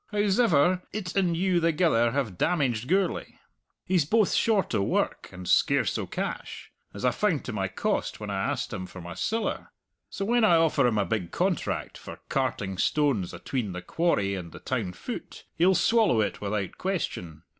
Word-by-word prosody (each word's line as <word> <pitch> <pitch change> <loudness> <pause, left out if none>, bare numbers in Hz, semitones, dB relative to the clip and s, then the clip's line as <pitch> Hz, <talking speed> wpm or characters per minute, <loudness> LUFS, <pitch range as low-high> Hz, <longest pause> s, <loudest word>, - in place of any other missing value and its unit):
Hows'ever, 190 -5 +3
it 190 -3 -5
and 180 -4 +2
you 180 -1 +2
thegither 160 -8 +3
have 125 -8 -1
damaged 125 - 0
Gourlay: 190 +2 0 0.5
he's 180 -3 +2
both 210 +6 +2
short 215 -4 +2
o' - - +2
work 100 - -1
and 90 0 -9
scarce - - +3
o' - - -3
cash, - - -5 0.2
as 100 - -5
I 125 - +4
found 180 -5 0
to 125 - -4
my 95 -2 -1
cost 95 - -2
when 105 -1 -5
I 95 -1 -1
asked 125 -4 -3
him 95 -3 -5
for 95 - -11
my 85 0 -7
siller! 225 +2 -2 0.4
So 200 - -4
when 240 +2 +2
I 175 -6 +6
offer 155 -5 +3
him 110 -3 +1
a 100 - +2
big 90 -3 -2
contract - - -2
for - - -10
carting 95 -1 -1
stones 135 - +1
atween 115 -8 -3
the 90 0 -6
quarry 100 - +1
and 90 -3 -6
the - - -9
town 90 - -2
foot, 90 - -8
he'll 185 +3 +4
swallow 220 - +3
it 105 - -1
without 100 -1 -3
question. 90 - -3
140 Hz, 180 wpm, -27 LUFS, -, 0.5 s, I